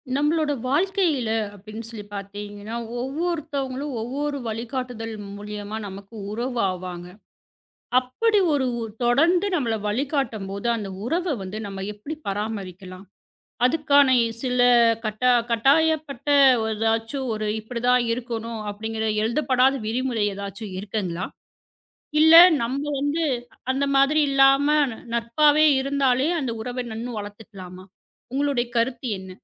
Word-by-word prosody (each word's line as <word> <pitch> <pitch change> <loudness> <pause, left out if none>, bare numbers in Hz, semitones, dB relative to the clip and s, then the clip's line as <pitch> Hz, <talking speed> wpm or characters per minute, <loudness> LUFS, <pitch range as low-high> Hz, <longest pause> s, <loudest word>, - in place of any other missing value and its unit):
நம்மளோட 300 +1 +1 0.2
வாழ்க்கையில 325 - +1 0.3
அப்பபிடின்னு 215 +2 -9
பார்த்தீங்கன்னா, 205 +2 -7 0.3
ஒவ்வொருத்தவங்களும் 285 -2 -3
ஒவ்வொரு 285 +5 -3
வழிகாட்டுதல் 230 0 -4 0.2
மூலியமா 210 +1 -6
நமக்கு 195 +3 -10 0.2
உறவு 240 +3 -3
ஆவாங்க. 180 -1 -7 0.9
அப்பபிடி 410 - +1
ஒரு 275 -2 +1
ஒ - - -3 0.2
தொடர்ந்து 330 +11 +3
நம்மள 240 -8 0
வழிகாட்டும்போது 225 -5 -2
அந்த 210 -4 -5 0.2
உறவ 340 +5 0
வந்து 190 +2 -6
நம்ம 195 -1 -6
எப்பபிடி 210 +10 -7
பராமரிக்கலாம்? 195 -2 -5 0.6
அதுக்கான 285 0 +4 0.3
சில 250 -1 -1 0.5
கட்டா 215 +4 +1 0.2
கட்டாயப்பட்ட 285 +3 +2 0.5
எதாச்சும் 225 +4 -1
ஒரு 215 0 -3
இப்பிடி 230 +2 -6
தான் 250 0 +4
இருக்கணும் 230 -1 -4
அப்பிடிங்கிற 220 +2 -4 0.2
எழுதப்படாத 255 +2 +2
விதிமுறை 235 -1 0
எதாச்சு 200 +2 -7
இருக்குங்களா? 190 -3 -3 1.0
இல்ல 320 +1 +7 0.3
நம்ம 255 +4 -2 0.2
வந்து 290 +4 0 0.5
அந்த 275 +1 0
மாதிரி 275 +3 +4
இல்லாம 275 +1 +5 0.2
ந - - -8 0.2
நட்பாவே 295 +6 +4
இருந்தாலே 270 0 +1
அந்த 260 -4 -2
உறவ 250 +1 -4
இன்னும் 230 0 -5
வளர்த்துக்கலாமா? 200 -3 -10 0.5
உங்களோட 280 -2 +1 0.2
கருத்து 240 +2 0
என்ன? 190 0 -10
240 Hz, 110 wpm, -24 LUFS, 210-280 Hz, 1.0 s, இல்ல